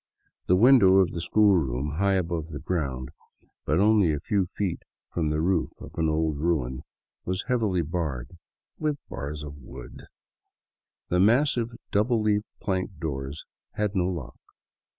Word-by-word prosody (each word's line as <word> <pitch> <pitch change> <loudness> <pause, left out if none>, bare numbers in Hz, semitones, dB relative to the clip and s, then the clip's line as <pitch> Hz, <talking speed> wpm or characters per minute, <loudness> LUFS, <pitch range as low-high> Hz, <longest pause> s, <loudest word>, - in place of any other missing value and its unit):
The; 90 - +5
window 105 -3 +7
of 95 -2 +4
the 85 - -4
school 105 +2 +4
room, 70 0 -2
high 100 0 +3
above 85 -3 -1
the 85 - -7
ground, 70 -7 -2 0.6
but 75 +5 +2
only 105 -4 +4
a 75 - -1
few 95 +3 0
feet 95 -1 -3 0.3
from 80 -3 0
the 75 0 0
roof 85 -1 +1
of - - -10
an 80 -1 0
old 80 -1 0
ruin, 70 -6 0 0.4
was 95 +1 -2
heavily 110 -9 +1
barred 75 -4 -4 0.2
— - - -48
with 150 -2 0
bars 75 +3 -5
of 75 -1 -8
wood! 65 - -11 1.0
The 90 - +2
massive 120 +3 +3 0.2
double 110 +3 +2
leaf 105 -1 +1
plank 95 -2 -2
doors 70 -2 -4 0.3
had 105 -1 -1
no 90 -1 +2
lock. 75 -9 -6
85 Hz, 155 wpm, -26 LUFS, 75-100 Hz, 1.0 s, window